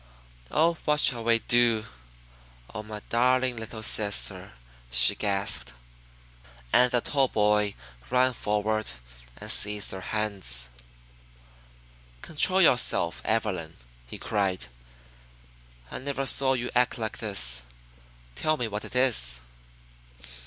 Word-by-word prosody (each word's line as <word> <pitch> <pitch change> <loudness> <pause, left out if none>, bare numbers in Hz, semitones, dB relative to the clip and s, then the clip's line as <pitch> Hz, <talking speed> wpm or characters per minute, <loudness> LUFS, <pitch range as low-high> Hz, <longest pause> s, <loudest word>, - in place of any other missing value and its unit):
Oh, 165 +2 +1
what 150 -1 +1
shall 120 -6 +4
we 115 0 +2
do? 115 -2 +1 0.9
Oh, 105 - -6
my 105 0 -10
darling 125 +1 +1
little 110 0 -8
sister!" 105 -2 0 0.4
she - - +7
gasped, 100 - -1 1.0
and 125 0 +4
the 120 -1 0
tall 135 0 0
boy 105 -2 0 0.3
ran 130 +1 +1
forward 110 - -3 0.5
and - - -2
seized 105 0 +3
her 95 - -7
hands. 95 - -1 1.5
"Control 185 +4 +1
yourself, 120 - +2
Evelyn," 90 -7 -3 0.3
he - - -9
cried. 95 -8 -3 1.3
"I - - -5
never 135 0 -4
saw 135 0 +2
you 125 -1 -4
act 125 +1 0
like 110 -2 -5
this. 60 - +2 0.7
Tell 155 - -2
me 120 - -3
what 105 0 -6
it - - -10
is." 105 - +3
110 Hz, 115 wpm, -25 LUFS, 100-125 Hz, 1.5 s, she